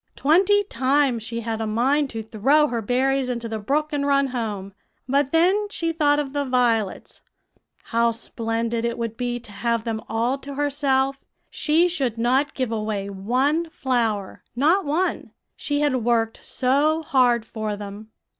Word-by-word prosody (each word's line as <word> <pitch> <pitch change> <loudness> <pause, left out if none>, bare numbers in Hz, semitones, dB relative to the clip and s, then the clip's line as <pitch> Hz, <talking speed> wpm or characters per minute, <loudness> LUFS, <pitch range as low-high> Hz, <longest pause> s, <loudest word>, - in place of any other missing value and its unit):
"Twenty 380 +8 +4
times 265 - +1
she 230 +1 -4
had 225 -1 -3
a 220 - -2
mind 270 +6 +1
to 225 -2 -5
throw 270 +8 +2
her 235 -1 -2
berries 260 +3 +1
into 235 -2 -3
the 220 -1 -4
brook 300 +8 -1
and 285 -1 0
run 280 -1 +2
home; 210 -6 -4 0.3
but 275 +1 +1
then 370 +6 +3
she 330 -5 -2
thought 295 -3 +2
of 285 -2 -3
the 285 -1 0
violets 240 -6 0 0.6
how 235 0 +1
splendid 230 0 -2
it 235 0 -1
would 230 -1 -3
be 245 0 -2
to 225 - -11
have 230 +2 -1
them 225 -2 -3
all 240 +4 0
to 280 0 -8
herself; 275 -1 0 0.3
she 330 +3 +2
should 270 -10 -2
not 255 +5 +1
give 255 -3 -2
away 215 -3 -3
one 260 - 0
flower, 235 - -2
not 320 +9 +3
one, 325 +6 -1 0.2
she 290 0 -2
had 290 -3 +2
worked 230 -1 0
so 290 +5 +1
hard 245 -5 +2
for 215 -2 -4
them. 205 +1 -9
255 Hz, 165 wpm, -23 LUFS, 225-290 Hz, 0.6 s, Twenty